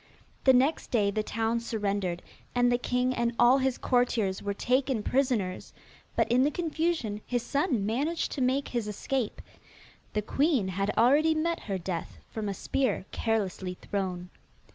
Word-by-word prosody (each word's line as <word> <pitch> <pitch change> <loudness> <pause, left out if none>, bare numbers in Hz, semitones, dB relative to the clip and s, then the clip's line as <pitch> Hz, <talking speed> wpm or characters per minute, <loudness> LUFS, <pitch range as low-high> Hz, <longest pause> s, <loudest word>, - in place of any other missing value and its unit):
The 265 - +7
next 265 +5 +2
day 205 -4 +2
the 215 - 0
town 225 +1 -1
surrendered, 200 -6 -2 0.3
and 245 0 +4
the 245 - +2
king 250 +1 0
and 235 -1 0
all 245 +3 +6
his 265 -1 0
courtiers 235 -6 +1
were 200 0 -3
taken 255 -1 +1
prisoners, 245 -9 0 0.4
but - - +2
in 250 +1 +5
the 285 - +3
confusion 315 -9 -1
his 245 -2 -1
son 275 - 0
managed 285 +10 -1
to 275 - -3
make 260 +2 +1
his 235 -3 -2
escape. 230 +3 -2 0.7
The 210 - 0
queen 270 - +1
had 195 +2 -1
already 290 +7 +5
met 335 +2 0
her 195 - 0
death 170 - -5
from 215 -2 -3
a 195 - -3
spear 230 -3 -1
carelessly 195 -4 -1
thrown. 185 -2 -4
235 Hz, 160 wpm, -29 LUFS, 200-265 Hz, 0.7 s, The